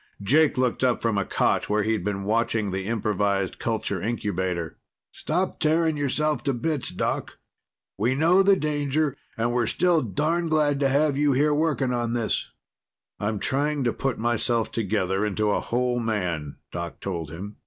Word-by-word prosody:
Jake 150 +8 +3
looked 125 0 0
up 125 -1 +2
from 115 -2 0
a 100 - -1
cot - - +1
where 105 0 +2
he'd 110 -3 0
been 100 0 -2
watching 110 -1 0
the 95 +1 -3
improvised 100 -3 0
culture 110 -5 -2
incubator. 95 -7 -2 0.3
"Stop 180 +4 -2
tearing 160 0 +2
yourself 150 +1 0
to 140 -3 +1
bits, 150 +2 -2
Doc. - - -3 0.6
We 120 +5 +2
know 170 +6 +4
the 195 0 +5
danger 150 -2 0 0.2
and 120 +1 0
we're 120 -2 +1
still 175 +5 +2
darned 160 - -1
glad 150 -3 +2
to 140 -1 +3
have 140 +1 +2
you 145 -1 +3
here 150 +3 +3
working 145 -4 +1
on 120 -1 -1
this." 115 -3 -1 0.7
"I'm 105 +1 -1
trying 145 +5 0
to 120 - +1
put 135 -2 -2
myself 120 0 0
together 100 -3 0
into 105 0 0
a - - +1
whole 125 0 0
man," 90 -10 -2 0.2
Doc 85 0 -5
told 85 -6 -4
him. 95 +6 -8
120 Hz, 165 wpm, -25 LUFS, 105-145 Hz, 0.7 s, the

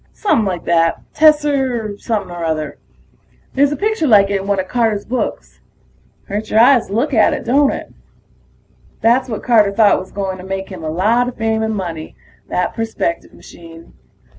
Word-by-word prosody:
Somepin' 235 - +1
like 180 -3 -3
that 165 -1 +2
tesser 275 -8 +2
something 205 -6 -3
or 175 -1 -6
other. 155 -2 -3 0.7
There's 280 +1 +2
a - - -1
picture 425 -6 0
like 200 -4 +5
it 200 -1 0
in 195 - -8
one 200 -1 +1
of 185 - -3
Carter's 225 -3 0
books. 255 +1 -4 0.6
Hurts 210 +1 -5
your 220 - +3
eyes 240 +1 +5
to 195 - -8
look 270 +7 0
at 220 -3 +3
it, - - -7
don't 275 +4 +3
it? - - -7 1.1
That's 250 +3 +2
what 220 - -5
Carter 215 -5 +4
thought 205 0 +4
was 185 - -10
going 190 -2 -4
to - - -9
make 195 0 -5
him 185 -4 -9
a 155 - -3
lot 220 +9 +1
of 250 - -6
fame 220 0 0
and 220 0 -1
money, 170 -5 -6 0.3
that 180 - -1
perspective 225 -7 -3
machine. 165 -1 -14
215 Hz, 185 wpm, -17 LUFS, 185-245 Hz, 1.1 s, like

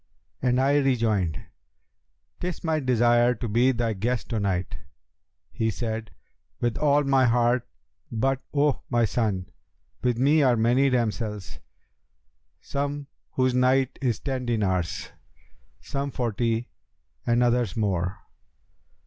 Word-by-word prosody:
and 125 0 +2
I 140 +2 +3
rejoined, 110 - +1 1.0
''Tis 180 -2 -4
my 160 -2 +1
desire 120 -2 +3
to 115 +2 -4
be 120 +5 +3
thy 115 -2 -1
guest 115 +4 -2
to 115 - -1
night.' 90 -6 -1 0.7
He 110 - -1
said, 110 0 -3 0.5
'With 120 -2 0
all 145 -1 +3
my 135 -2 +3
heart; 120 +1 +2 0.4
but, 135 +4 0
O 145 -1 +1
my 120 -2 +3
son, 105 -6 -1 0.5
with 125 -2 +1
me 145 +5 +4
are 125 -4 +4
many 120 +5 +3
damsels, 110 - -2 1.0
some 145 +1 -3 0.3
whose 130 -1 +2
night 130 +1 +2
is 120 -5 0
ten 130 -3 -3
dinars, 95 -7 -1 0.7
some 140 0 -3
forty 115 -1 -1 0.6
and 120 +1 +3
others 120 -5 +1
more. 95 -4 -1
120 Hz, 120 wpm, -26 LUFS, 110-130 Hz, 1.0 s, me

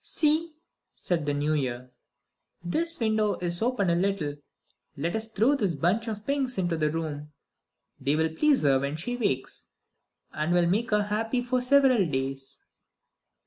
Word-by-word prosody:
"See," 315 +1 +1 0.4
said 165 -5 -2
the 145 - +1
New 145 +2 0
Year, 125 -3 -3 0.7
"this 330 - -1
window 220 -2 +1
is 175 -1 -3
open 235 -4 +1
a - - +2
little; 175 -6 -1 0.6
let 165 +7 -2
us 220 0 -3
throw 225 +5 +2
this 200 - 0
bunch 185 - +1
of 215 -1 -5
pinks 275 -3 -1
into 175 -3 0
the 155 -1 +1
room. 150 -2 -4 0.7
They 140 +2 +1
will 160 0 0
please 295 - +3
her 135 -2 +4
when 140 +2 -2
she 215 +10 -3
wakes, 200 - -2 0.7
and 155 +3 -1
will 175 -1 +4
make 210 +8 +1
her 210 -1 +2
happy 225 +4 -1
for 250 +1 0
several 260 -3 +4
days." 135 -1 -4
185 Hz, 160 wpm, -27 LUFS, 150-240 Hz, 0.7 s, her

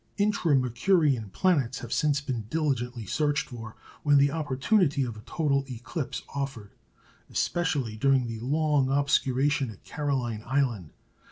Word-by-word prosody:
Intra 205 -7 +2
Mercurian 130 - +2
planets 135 - +1
have 120 - -5
since 145 -2 +2
been 125 -6 -4
diligently 125 -6 -1
searched 150 - 0
for 115 -3 -8 0.3
when 145 -1 +4
the 140 0 +4
opportunity 150 +1 +1
of 120 -3 -4
a 105 - -10
total 140 -4 +1
eclipse 130 +1 -5
offered, 135 -7 -4 0.6
especially 140 -10 -1
during 135 +1 +3
the 115 -1 -5
long 145 +1 +1
obscuration 140 -1 +2
at 105 - -12
Caroline 130 -7 -2
Island. 120 - 0
135 Hz, 135 wpm, -27 LUFS, 120-150 Hz, 0.6 s, when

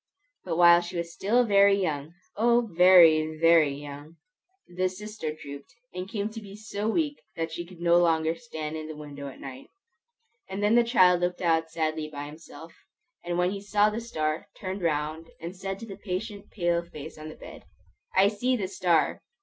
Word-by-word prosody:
But 165 -3 -3
while 175 0 +7
she 175 +1 -6
was 170 0 -4
still 235 +5 +2
very 200 -1 +5
young, 155 -3 -3 0.2
O, 235 +2 +3
very, 165 -3 +6
very 165 -2 +5
young, 145 +2 -9 0.5
the 185 +1 -1
sister 210 -3 -6
drooped, 140 -2 -10 0.2
and 180 +1 -6
came 210 -2 -2
to 225 0 -8
be 200 -1 -11
so 210 0 -4
weak 290 +3 -1
that 165 0 -3
she 170 +1 -6
could 180 -1 -14
no 170 0 +4
longer 160 -2 +2
stand 160 -8 -6
in 155 0 -6
the 155 - -7
window 145 -2 -8
at 135 - -10
night; 135 -1 -10 0.8
and 195 +2 -4
then 210 +2 +3
the 240 0 +6
child 185 -7 +4
looked 175 0 0 0.3
sadly 155 -1 -2
out - - -14
by 145 0 -5
himself, 160 +1 -12 0.5
and 175 0 -2
when 180 +1 +2
he 200 0 -5
saw 205 +1 +2
the 225 +2 -4
star, 155 -9 -3
turned 190 +1 -5
round 155 0 -2
and 170 +3 -7
said 195 +1 -5
to 230 - -8
the 195 -3 -9
patient 205 +2 -5
pale 175 -3 0
face 160 -3 -10
on 155 0 -8
the - - -10
bed, - - -12 0.5
"I 195 +2 +6
see 245 +5 0
the 200 -6 -2
star!" 175 -4 +1
175 Hz, 190 wpm, -27 LUFS, 155-200 Hz, 0.8 s, while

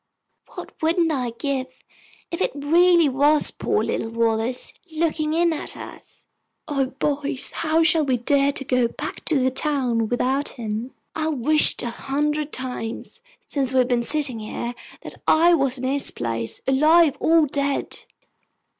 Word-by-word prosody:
What - - -8
wouldn't 330 +1 +2
I 255 -5 -1
give 270 -1 -2 0.6
if 335 - -4
it - - 0
really 335 +3 +4
was 285 +3 +3
poor - - -1
little 225 - -2
Wallace 230 +2 0 0.2
looking 310 -1 -1
in 340 0 +2
at 310 - -7
us! - - -12 0.4
O 275 -3 0
boys, 280 0 -1
how 325 0 +1
shall 325 -1 +3
we 260 -3 +1
dare 280 +3 +2
to 275 - -5
go 250 -2 +2
back - - -7
to 315 - +3
the 260 0 +1
town 255 -6 0
without 260 +4 0
him? 225 +1 -5 0.2
I've 315 -1 -1
wished 300 +5 +3
a 240 - -3
hundred 295 +4 -2
times, 250 - -6 0.2
since 270 -3 -1
we've 255 -1 +3
been 245 -1 +1
sitting 275 -2 0
here, 235 +2 -5 0.3
that - - -11
I 340 +2 +5
was 275 -5 +1
in 255 - -8
his 275 +2 +2
place, 115 -1 -3
alive 305 +3 +4
or 325 -1 +4
dead!" 280 0 -1
275 Hz, 155 wpm, -22 LUFS, 250-310 Hz, 0.6 s, I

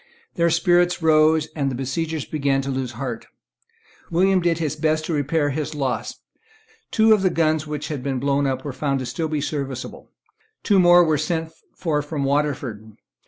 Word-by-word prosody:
Their 170 -3 +2
spirits 175 +1 +2
rose; 155 0 +4
and 140 -3 0
the 130 - -4
besiegers 150 +4 -3
began 140 -3 0
to 135 - -3
lose 130 -2 -3
heart. 120 -1 -5 0.8
William 185 +2 +3
did 170 -2 +1
his 155 -3 -2
best 155 0 0
to 165 - -2
repair 145 0 0
his 150 +2 -4
loss. 135 -3 -3 0.7
Two 220 -1 +4
of 210 - +2
the 190 - +3
guns 155 -2 0
which 150 0 -5
had 145 -4 -4
been 135 0 -2
blown 140 +2 +1
up 130 0 -3
were 140 - -4
found 140 0 -1
to 135 +7 -3
be 150 -2 -1
still 150 0 -2
serviceable. 130 -2 -7 0.5
Two 200 -3 +3
more 175 0 +7
were 155 -3 +1
sent 160 0 -2 0.2
for 155 -4 -1
from 145 -1 -4
Waterford. 135 -7 -2
150 Hz, 180 wpm, -22 LUFS, 135-165 Hz, 0.8 s, more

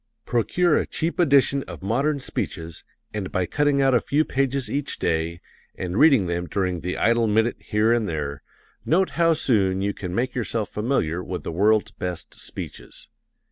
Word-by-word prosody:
Procure 155 +8 +2
a - - -2
cheap 165 +3 -2
edition 140 -4 +4
of 85 -1 -9
modern 140 +8 +1
speeches, 80 - -4 0.3
and 105 -3 -4
by 95 - 0
cutting 145 - +2
out 135 -1 +4
a 120 - +4
few 150 +2 +1
pages 135 -1 0
each 140 +5 -2
day, 85 +1 -1 0.3
and 90 -1 -4
reading 140 -10 +6
them 85 0 -2
during 90 -2 -1
the 90 +2 -3
idle 115 0 +3
minute 110 +3 +2
here 110 +1 +2
and 115 -4 0
there, 70 -3 -3 0.4
note 185 +4 +2
how 165 0 +3
soon 100 -10 +1
you 100 0 0
can 90 -3 -5
make 125 +3 0
yourself 115 -3 -2
familiar 100 - -1
with 90 -1 -5
the - - -4
world's 105 +4 +2
best 90 -5 -6
speeches. - - -8
110 Hz, 175 wpm, -24 LUFS, 90-135 Hz, 0.4 s, reading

